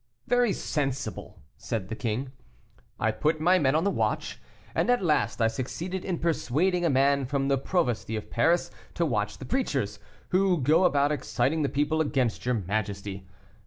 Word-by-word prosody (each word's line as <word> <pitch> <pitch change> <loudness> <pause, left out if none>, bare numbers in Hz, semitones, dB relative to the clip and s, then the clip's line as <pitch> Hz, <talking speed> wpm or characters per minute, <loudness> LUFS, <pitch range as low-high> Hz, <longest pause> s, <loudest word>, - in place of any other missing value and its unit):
"Very 245 -3 +3
sensible!" 135 - -3
said 105 -5 -4
the 110 - -3
king. 120 +4 -3 0.7
"I 110 - +2
put 155 +7 0
men 175 -2 +3
on 160 - +2
the 200 - +2
watch, - - -2 0.3
and - - +1
at 245 -5 +3
last 150 -6 +1
I 115 - +4
succeeded 170 +10 -4
in 185 -3 -2
persuading 170 +3 +1
a 170 - +3
man 140 0 +3
from 135 0 0
the 135 - +3
provosty 125 - -1
of 110 - -6
Paris 165 +9 +2 0.2
to - - +1
watch - - -1
the - - -8
preachers, 135 - -1 0.3
who 185 -1 +3
go 155 +7 +4
about 145 -4 +3
exciting 150 +2 0
the 140 - +1
people 150 +2 +1
against 130 -6 0
your 125 - +2
majesty. 100 -1 -3
140 Hz, 165 wpm, -27 LUFS, 120-170 Hz, 0.7 s, I